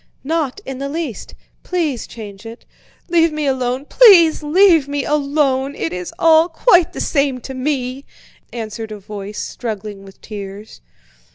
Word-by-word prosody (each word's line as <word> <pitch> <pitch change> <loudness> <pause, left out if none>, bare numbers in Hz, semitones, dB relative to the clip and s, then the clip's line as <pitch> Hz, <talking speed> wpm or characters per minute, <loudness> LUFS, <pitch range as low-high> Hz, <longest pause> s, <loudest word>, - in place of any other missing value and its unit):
Not 315 +2 -2
in 265 -1 -6
the 275 0 -4
least! 305 -6 -5 0.3
Please 320 -9 -2
change 205 -3 -10
it." 230 +1 -11 0.4
"Leave 335 -2 +3
me 305 -1 -3
alone, 260 0 -1
please 350 -8 +6
leave 325 -1 +4
me 285 -1 -2
alone! 280 -2 0
It 165 - -3
is 180 -1 -5
all 325 0 +5
quite 355 +1 +3
the - - -6
same 275 -3 0
to 265 - -7
me," 260 0 -3 0.5
answered 220 -1 -6
a 210 - -6
voice 205 +1 -8
struggling 210 -4 -6
with 195 0 -15
tears. 205 0 -9
270 Hz, 150 wpm, -18 LUFS, 220-315 Hz, 0.5 s, please